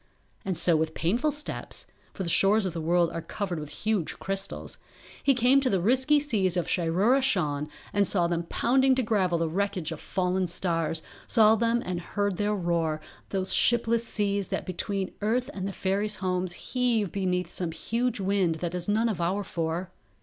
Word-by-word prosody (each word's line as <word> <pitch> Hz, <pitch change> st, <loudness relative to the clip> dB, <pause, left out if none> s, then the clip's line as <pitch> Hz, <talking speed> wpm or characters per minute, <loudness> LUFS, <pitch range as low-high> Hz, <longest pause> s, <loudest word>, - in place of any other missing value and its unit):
And 190 Hz, -3 st, -2 dB
so 170 Hz, 0 st, +4 dB
with 160 Hz, 0 st, -1 dB
painful 235 Hz, -, +1 dB
steps 295 Hz, 0 st, -3 dB, 0.3 s
(for 190 Hz, -, -5 dB
the -, -, -4 dB
shores 200 Hz, +4 st, +4 dB
of 185 Hz, -, -2 dB
the 165 Hz, -, -4 dB
world 170 Hz, +1 st, +2 dB
are 165 Hz, -, -4 dB
covered 175 Hz, +1 st, -4 dB
with 150 Hz, -1 st, -7 dB, 0.2 s
huge 210 Hz, -7 st, 0 dB
crystals) 195 Hz, 0 st, -4 dB, 0.4 s
he 275 Hz, -, +3 dB
came 255 Hz, +3 st, +4 dB
to 265 Hz, -, +1 dB
the 195 Hz, -, +2 dB
risky 260 Hz, +9 st, +3 dB
seas 205 Hz, -, 0 dB
of 175 Hz, -, 0 dB
Shiroora 190 Hz, +10 st, +2 dB
Shan 150 Hz, -, 0 dB, 0.2 s
and 205 Hz, -1 st, +3 dB
saw 175 Hz, -2 st, +3 dB
them 170 Hz, 0 st, -1 dB
pounding 265 Hz, +2 st, +3 dB
to 260 Hz, -, +1 dB
gravel 190 Hz, -6 st, +1 dB
the 165 Hz, 0 st, 0 dB
wreckage 190 Hz, -1 st, -2 dB
of 160 Hz, -, -5 dB
fallen 185 Hz, 0 st, -1 dB
stars, 165 Hz, -2 st, -1 dB, 0.2 s
saw 220 Hz, -1 st, +5 dB
them 230 Hz, +1 st, +1 dB
and 180 Hz, -1 st, -3 dB
heard 200 Hz, +1 st, -2 dB
their 210 Hz, 0 st, 0 dB
roar, 170 Hz, -4 st, 0 dB, 0.3 s
those 190 Hz, -1 st, -1 dB
shipless 235 Hz, -1 st, +4 dB
seas 200 Hz, -3 st, -1 dB
that -, -, -3 dB
between 190 Hz, +1 st, -3 dB
earth 240 Hz, +4 st, 0 dB
and 190 Hz, -1 st, -4 dB
the -, -, -3 dB
fairies' 200 Hz, +2 st, -1 dB
homes 185 Hz, -1 st, -1 dB
heave 235 Hz, -3 st, 0 dB
beneath 180 Hz, -2 st, -1 dB
some 175 Hz, -3 st, -2 dB
huge 230 Hz, +7 st, -2 dB
wind 190 Hz, -3 st, +1 dB
that 170 Hz, +1 st, -4 dB
is 180 Hz, +1 st, -3 dB
none 220 Hz, +3 st, +2 dB
of 205 Hz, -6 st, -2 dB
our 190 Hz, +4 st, 0 dB
four. 170 Hz, 0 st, -3 dB
190 Hz, 185 wpm, -27 LUFS, 175-220 Hz, 0.4 s, saw